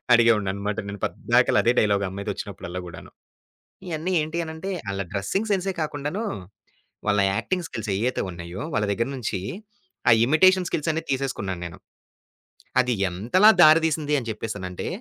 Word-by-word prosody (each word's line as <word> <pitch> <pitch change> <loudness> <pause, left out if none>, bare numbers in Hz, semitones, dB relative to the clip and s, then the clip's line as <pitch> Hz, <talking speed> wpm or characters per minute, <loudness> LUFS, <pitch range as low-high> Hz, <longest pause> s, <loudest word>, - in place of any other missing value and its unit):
అడిగేవాడినన్నమాట 105 -3 +2
నేను. 100 -1 -7
పద్దాకల - - +2
అదే 120 - +5
డైలాగ్ 100 -2 +2
అమ్మాయితో 100 +1 -5
వచ్చినప్పుడల్లా 90 +1 -6
కూడా. 85 - -9 0.9
ఇయన్ని 165 +2 -3
ఏంటి 155 +2 -4
అనంటే, 160 +4 -6 0.2
ఆళ్ల 100 0 -2
డ్రెస్సింగ్ 190 - -1
సెన్సే 195 0 0
కాకుండా, 145 -1 -3 1.0
వాళ్ల 105 -1 +3
యాక్టింగ్ 180 - -1
స్కిల్స్ 110 -2 -5
ఏవైతే 125 +4 0
ఉన్నాయో, 85 +2 -7
వాళ్ల 105 - +1
దగ్గర 115 +4 -1
నుంచి 105 -5 -3 0.7
ఆ - - +8
ఇమిటేషన్ 185 +7 +4
స్కిల్స్ 155 +1 -2
అన్నీ 160 +1 -1
తీసేసుకున్నాను 105 -9 -3
నేను. 85 - -10 1.0
అది 125 -1 +2
ఎంతలా 115 - +4
దారి 155 -1 +8
తీసింది 150 -2 0
అని 120 - -8
చెప్పేసానంటే, 100 -4 -5
115 Hz, 140 wpm, -24 LUFS, 100-155 Hz, 1.0 s, ఆ